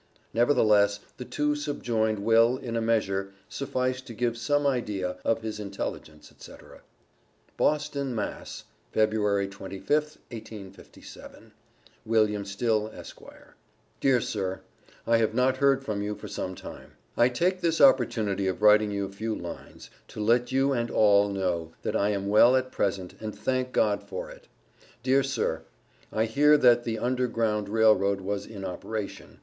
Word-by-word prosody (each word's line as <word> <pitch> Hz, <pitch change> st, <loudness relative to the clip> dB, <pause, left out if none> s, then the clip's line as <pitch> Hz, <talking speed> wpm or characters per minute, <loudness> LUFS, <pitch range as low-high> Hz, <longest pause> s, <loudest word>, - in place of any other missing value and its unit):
Nevertheless 105 Hz, -5 st, +3 dB, 0.2 s
the 125 Hz, -, -7 dB
two 150 Hz, +3 st, 0 dB
subjoined 115 Hz, -7 st, -1 dB
will, 115 Hz, +2 st, +4 dB
in 120 Hz, -4 st, -6 dB
a 115 Hz, -, 0 dB
measure, 100 Hz, -4 st, 0 dB
suffice 130 Hz, -2 st, -2 dB
to 120 Hz, -3 st, -11 dB
give 120 Hz, 0 st, -1 dB
some 145 Hz, +5 st, 0 dB
idea 100 Hz, -9 st, -1 dB
of 115 Hz, 0 st, 0 dB
his 110 Hz, -1 st, -5 dB
intelligence, 100 Hz, -6 st, -6 dB
etc. -, -, -14 dB, 0.7 s
BOSTON, 140 Hz, -4 st, 0 dB
Mass., 105 Hz, -, -5 dB, 0.3 s
Feb. 110 Hz, 0 st, +3 dB
25th, 100 Hz, +7 st, -1 dB
1857. 105 Hz, -4 st, -11 dB, 0.5 s
WILLIAM 105 Hz, -2 st, +1 dB
STILL, 110 Hz, +2 st, 0 dB
Esq.: 110 Hz, -, -11 dB, 0.8 s
Dear 130 Hz, -2 st, +3 dB
Sir 95 Hz, -4 st, -3 dB, 0.4 s
I 115 Hz, -, +3 dB
have 110 Hz, -1 st, 0 dB
not 130 Hz, +1 st, +2 dB
heard 135 Hz, -1 st, +2 dB
from 105 Hz, -3 st, -2 dB
you 105 Hz, +1 st, -3 dB
for 105 Hz, -, -9 dB
some 95 Hz, -2 st, -5 dB
time. -, -, -11 dB, 0.2 s
I 120 Hz, +1 st, +4 dB
take 180 Hz, +9 st, 0 dB
this 165 Hz, -1 st, +1 dB
opportunity 110 Hz, -7 st, +3 dB
of 95 Hz, +3 st, -3 dB
writing 105 Hz, 0 st, +6 dB
you 100 Hz, -1 st, -2 dB
a 95 Hz, -, -8 dB
few 110 Hz, +2 st, -3 dB
lines 85 Hz, -1 st, -9 dB, 0.2 s
to -, -, -10 dB
let 120 Hz, +3 st, +2 dB
you 135 Hz, +1 st, +2 dB
and 120 Hz, -2 st, -1 dB
all 100 Hz, -1 st, +4 dB
know 90 Hz, -4 st, -2 dB
that -, -, -2 dB
I 100 Hz, -, +2 dB
am 100 Hz, -1 st, -2 dB
well 115 Hz, +5 st, +6 dB
at 130 Hz, 0 st, 0 dB
present 95 Hz, -2 st, -2 dB
and 110 Hz, -1 st, -6 dB
thank 130 Hz, -1 st, -1 dB
God 105 Hz, -4 st, +1 dB
for -, -, -7 dB
it. -, -, -15 dB, 0.6 s
Dear 135 Hz, +2 st, +3 dB
Sir, 130 Hz, -12 st, -2 dB, 0.5 s
I 110 Hz, +1 st, +1 dB
hear 145 Hz, +6 st, +4 dB
that 120 Hz, -3 st, +4 dB
the 115 Hz, -1 st, -2 dB
under 125 Hz, +2 st, 0 dB
ground 110 Hz, -3 st, -1 dB
railroad 100 Hz, -3 st, +3 dB
was 100 Hz, +1 st, -4 dB
in 100 Hz, -3 st, -8 dB
operation. 100 Hz, +3 st, -6 dB
110 Hz, 155 wpm, -27 LUFS, 100-125 Hz, 0.8 s, writing